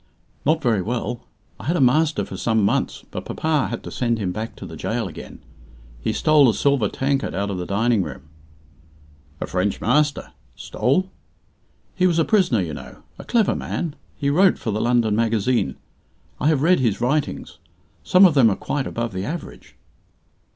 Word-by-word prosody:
"Not 155 0 +2
very 115 -6 +2
well. 120 +3 -4 0.3
I - - -9
had 165 +6 +1
a - - 0
master 150 +5 +3
for - - -8
some 110 -3 +1
months, - - -1
but - - -5
papa 155 -3 0
had 120 - -5
to - - -8
send 120 -2 0
him 95 -4 -2
back 110 +4 -5
to - - -9
the - - -9
gaol 115 -2 -2
again. 85 - -10 0.6
He - - -1
stole 145 +3 +4
a 110 - 0
silver 140 -8 +2
tankard 135 0 -1
out 100 0 -1
of 95 - -4
the 90 - -5
dining 110 +2 +2
room." 70 - -6 1.2
"A - - -2
French 95 +2 -1
master! 145 +5 +1 0.2
Stole 140 - -1 0.4
" - - -40
"He 185 -1 +3
was 170 -2 +1
a 165 - +3
prisoner, 180 - +2
you 80 -4 -4
know. - - -10 0.2
A - - -7
clever 225 -4 +2
man. 165 -4 -4 0.2
He 140 -1 0
wrote 185 +5 +4
for 110 - -3
the 105 +1 -1
London 120 -3 +2
Magazine. 115 - +1 0.6
I - - +1
have 150 -3 +2
read 180 +3 +4
his 115 -6 0
writings. 140 +5 -2 0.4
Some 185 +2 +6
of 175 - +5
them 130 -6 +5
are 100 - 0
quite 145 -3 -3
above 115 -2 -3
the 95 +1 -3
average." 165 +5 -7
120 Hz, 185 wpm, -22 LUFS, 110-150 Hz, 1.2 s, Some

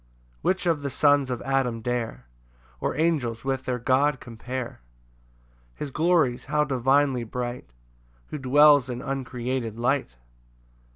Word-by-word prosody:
3 - - -33
Which 190 0 0
of 165 -4 +1
the 140 - -3
sons 145 -1 +3
of 125 -2 -3
Adam 135 -4 0
dare, 115 - -3 0.5
Or - - -2
angels, 135 -8 0
with 135 -1 -2
their 125 -1 -1
God 130 +3 +2
compare? 125 - -6 0.9
His 145 - -6
glories 155 -5 +2
how 150 +2 +1
divinely 135 -1 +2
bright, 120 - -5 0.6
Who 150 - -5
dwells 145 0 +5
in 120 -1 -5
uncreated 125 -3 -3
light! 120 - -1
130 Hz, 130 wpm, -25 LUFS, 120-145 Hz, 0.9 s, dwells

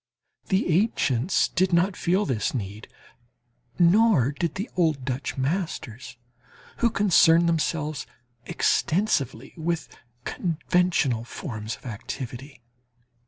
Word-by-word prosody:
The 190 0 +1
ancients 155 - +1
did 185 +1 +1
not 180 +3 +2
feel 185 +4 +1
this 130 -1 -1
need, 105 -2 -5 0.9
nor 175 - +4
did 155 +2 -3
the 200 +5 -3
old 155 -7 +1
Dutch 130 +1 -3
masters, 135 - -3 0.6
who 235 - +3
concerned 170 -5 +4
themselves 155 -3 -1 0.4
extensively 140 - 0
with 165 +1 -2 0.4
conventional 165 -7 0
forms 110 - -6
of - - -21
activity. 125 +3 -7
160 Hz, 100 wpm, -25 LUFS, 125-180 Hz, 0.9 s, nor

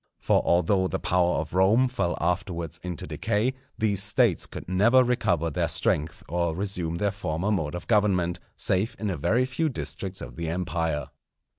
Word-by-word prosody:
For - - +2
although 95 +2 +2
the - - -2
power 90 -1 +1
of 80 0 -3
Rome 100 +8 +4
fell 90 -9 -1
afterwards 85 -1 -2
into 90 -1 -5
decay, 110 +6 0 0.2
these 100 -3 +1
States 105 -1 +2
could - - -9
never 110 +8 +5
recover 85 -10 +1
their 85 +3 0
strength 85 -1 0
or 85 -1 -1
resume 90 -3 -1
their 100 +2 +1
former 95 0 -2
mode 80 -6 -1
of 90 - -6
government, 95 -5 +2 0.2
save 105 +5 0
in 105 -2 -2
a - - -2
very 115 - +2
few 155 +5 -1
districts 95 -7 -4
of 60 -1 -9
the 85 -1 -3
Empire. 80 -3 -2
90 Hz, 170 wpm, -26 LUFS, 85-105 Hz, 0.2 s, never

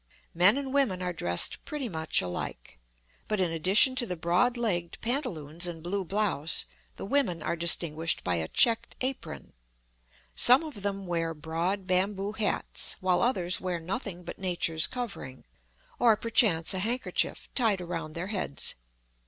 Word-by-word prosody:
Men 185 +8 +5
and 275 -1 -4
women 220 -11 +1
are 180 0 -2
dressed 90 - +2
pretty 295 -4 -4
much 160 - +1
alike, 85 -9 -6 0.5
but 215 - -1
in 180 -3 +1
addition 190 - +4
to 240 -2 +4
the 180 - -3
broad 180 +9 +1
legged 175 -8 -2
pantaloons 175 - -2
and 165 -2 -7
blue 195 +3 -2
blouse, 185 -5 0 0.3
the - - -7
women 200 - 0
are - - -1
distinguished 165 -1 +2
by 90 -1 0
a 80 -1 -2
checked 230 - +3
apron. 260 +1 -4 0.8
Some 250 +6 +5
of 295 -10 -8
them 195 -1 -3
wear 165 -2 -2
broad 170 +6 -3
bamboo 195 +2 0
hats, 215 -1 -2
while 185 -1 +1
others 185 -8 +2
wear 180 -2 -3
nothing 180 +1 -5
but 170 - -9
nature's 175 -4 0
covering, 215 - -7 0.5
or 230 -3 +5
perchance 205 -8 +3
a 190 - -2
handkerchief 235 +6 -2
tied 220 -7 +2
around 165 -3 -6
their 170 +2 -4
heads. 165 -8 -4
185 Hz, 155 wpm, -28 LUFS, 165-220 Hz, 0.8 s, Men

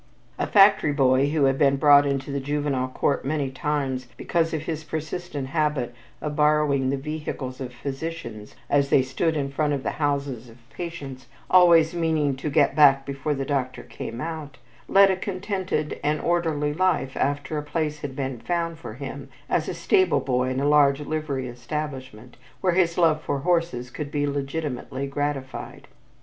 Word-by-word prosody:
A - - 0
factory 195 -7 +5
boy 135 0 +3
who 150 -1 +1
had 135 0 +2
been 140 -2 +4
brought 145 0 +6
into 140 0 -2
the 140 - -1
Juvenile 145 -2 -1
Court 140 +2 -1
many 140 -1 -1
times 135 -2 -2
because 165 -1 0
of 155 -2 -3
his 160 -1 -4
persistent 155 -2 -5
habit 150 -5 0 0.3
of 150 -1 -3
borrowing 150 -3 +2
the 140 - 0
vehicles 140 -3 -5
of 130 -1 -5
physicians 135 -4 -6
as 140 -1 +2
they 135 - +5
stood 155 +5 -1
in 140 -1 -2
front 150 +1 0
of 135 -2 -3
houses 140 -5 -2
of 115 - -15
patients, 140 -5 -7 0.2
always 170 -3 +6
meaning 160 -5 +1
to 150 - -3
"get 145 -2 +3
back 135 -2 +6
before 140 +2 -2
the 135 0 -3
doctor 135 -2 -2
came 115 - -7
out," 155 -1 -6 0.3
led 195 0 +6
a - - +1
contented 185 -5 -3
and 150 +1 +1
orderly 160 -4 0
life 165 -6 0
after 145 +2 -1
a - - -5
place 150 0 -2
had 145 -3 -6
been 135 -3 -3
found 170 +2 -2
for 110 -9 -8
him 140 +1 -7 0.2
as - - 0
a - - -2
stable 375 -2 +3
boy 125 -1 0
in 130 0 -1
a 140 - +1
large 145 -1 +4
livery 145 -4 -3
establishment 130 -2 -6 0.2
where 185 -2 +1
his 170 -2 +2
love 160 -3 +3
for 140 -3 -2
horses 165 -8 0
could 150 -2 -5
be 145 0 -1
legitimately 140 -2 -3
gratified. 140 -1 -4
145 Hz, 170 wpm, -24 LUFS, 135-155 Hz, 0.3 s, brought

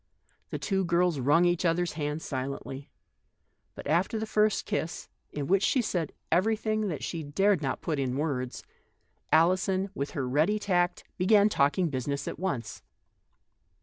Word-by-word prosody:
The - - -3
two 195 -2 0
girls 170 -3 +2
wrung 150 +7 +4
each 175 0 +1
other's 175 0 +1
hands 150 0 -3
silently. 135 0 -5 0.9
But - - -9
after 175 +8 +1
the 220 - -2
first 215 -1 +1
kiss, 165 - -3 0.2
in 145 -1 -3
which 190 +5 +3
she 260 - +2
said 175 - -1 0.2
everything 215 +2 +1
that 160 -6 -4
she 165 - -3
dared 180 +5 +2
not 135 -3 -2
put 155 -4 -2
in 130 -1 -1
words, 135 -5 -2 0.7
Alison, 185 +4 +3
with 140 -7 -3
her 130 -2 -1
ready 155 +11 +2
tact, 180 -3 0 0.2
began 205 +3 +5
talking 165 +1 +2
business 140 +1 -3
at - - -5
once. 135 - -3
170 Hz, 150 wpm, -28 LUFS, 145-190 Hz, 0.9 s, began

